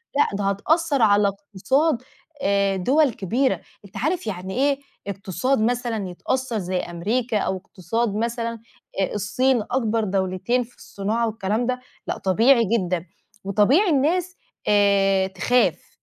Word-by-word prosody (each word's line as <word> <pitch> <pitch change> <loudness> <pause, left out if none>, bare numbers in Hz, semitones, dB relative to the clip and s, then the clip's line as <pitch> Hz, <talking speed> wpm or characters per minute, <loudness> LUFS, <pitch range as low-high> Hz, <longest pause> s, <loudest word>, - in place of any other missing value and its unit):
لأ، 205 -8 +2
ده 205 - -2
هتأثر 285 - +1
على 205 -1 +5
اقتصاد 225 - 0 0.4
آآ 200 0 +2
دول 265 +7 +2
كبيرة، 245 +8 0 0.2
أنت 195 - -11
عارف 315 -1 -1
يعني 190 -1 -4
إيه 280 0 +2 0.3
اقتصاد 200 +7 -1
مثلًا 230 -3 -1
يتأثر 255 +6 -2
زي 185 -1 -2
أمريكا، 215 +7 -1
أو 190 - -1
اقتصاد 205 +4 -3
مثلًا 230 0 -2 0.4
آآ - - -1
الصين 240 +5 +1
أكبر 230 -3 +1
دولتين 190 +5 0
في 245 - -19
الصناعة 220 +4 -2
والكلام 220 +2 -1
ده، 250 0 -1 0.3
لأ - - -2
طبيعي 230 +7 +4 0.2
جدًا 180 -3 -2 0.4
وطبيعي 215 - +3
الناس 340 +6 +1 0.3
آآ 195 -2 +3
تخاف 190 +7 +1
220 Hz, 130 wpm, -23 LUFS, 195-255 Hz, 0.4 s, على